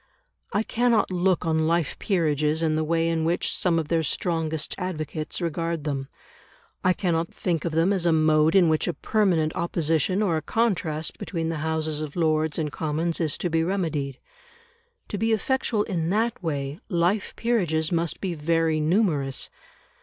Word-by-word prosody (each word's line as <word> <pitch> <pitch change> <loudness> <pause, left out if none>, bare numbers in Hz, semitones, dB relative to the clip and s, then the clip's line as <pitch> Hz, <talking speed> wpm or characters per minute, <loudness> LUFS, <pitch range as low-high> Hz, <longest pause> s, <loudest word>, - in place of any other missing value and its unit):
I 205 - +1
cannot 235 -3 +2
look 180 -1 +1
on 160 -1 +1
life 165 -3 +1
peerages 155 -4 +1
in 160 -1 +2
the 155 0 +1
way 165 +1 +1
in 165 -1 0
which 170 +2 0
some 175 -2 +2
of 160 -2 -1
their 165 -1 +2
strongest 160 -1 -1
advocates 155 -4 -3
regard 165 -2 -2
them; 140 -3 -3 0.8
I 185 - +4
cannot 170 -3 0
think 170 -3 -2
of 165 - -2
them 165 +5 +3
as 180 -3 +1
a - - +4
mode 155 0 +4
in 185 -3 +6
which 155 -1 +1
a 175 - -1
permanent 180 -8 +1
opposition 170 +3 +1
or 170 -6 +1
a - - -2
contrast 165 -6 -1
between 165 -3 -3
the 165 - -2
Houses 155 0 -1
of 150 -2 -6
Lords 155 -2 +1
and 155 -3 -1
Commons 160 +2 -1
is 155 -3 0
to 175 - -2
be 160 0 +2
remedied. 160 -7 -2 0.9
To 205 - -3
be 225 0 +2
effectual 220 -1 +1
in 170 -6 -2
that 225 +4 0
way, 145 -2 -3
life 180 +2 0
peerages 175 -10 0
must 170 -1 -1
be 185 -3 -2
very 165 0 +1
numerous. 155 -5 +1
165 Hz, 170 wpm, -25 LUFS, 155-180 Hz, 0.9 s, in